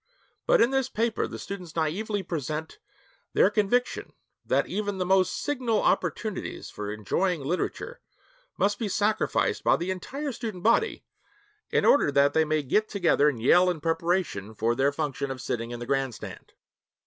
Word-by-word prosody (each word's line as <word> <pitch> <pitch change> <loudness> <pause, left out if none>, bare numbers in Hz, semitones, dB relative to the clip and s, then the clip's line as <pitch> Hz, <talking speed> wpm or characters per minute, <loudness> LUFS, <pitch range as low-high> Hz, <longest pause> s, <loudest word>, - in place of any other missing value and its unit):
But - - +5
in 235 - +4
this 270 -1 +1
paper 225 0 0
the - - -7
students 180 -5 -7
naïvely 190 +5 -2
present 155 0 -4 0.5
their 195 - +4
conviction 220 +4 0 0.3
that - - +1
even 205 -1 -3
the 185 - -1
most 190 0 +3
signal 250 -7 0
opportunities 215 -4 -1
for 105 0 -5
enjoying 150 - -1
literature 180 - -3 0.6
must 205 +1 +1
be 220 -4 -2
sacrificed 210 +2 +1
by - - +5
the 175 +2 -2
entire 275 +10 -4
student 220 -7 -6
body 235 - +2 0.7
in - - +2
order 215 - +5
that 140 +1 +4
they 160 0 +3
may 155 -1 0
get 210 +11 +1
together 170 -6 +3
and 130 -6 -4
yell 180 +7 +6
in 175 -3 -2
preparation 165 - -1
for 115 +2 +1
their 135 +3 +2
function 145 -2 -3
of 135 -1 -5
sitting 115 -2 -3
in 120 0 -6
the 120 - -5
grandstand. 135 -2 -3
180 Hz, 160 wpm, -27 LUFS, 140-215 Hz, 0.7 s, yell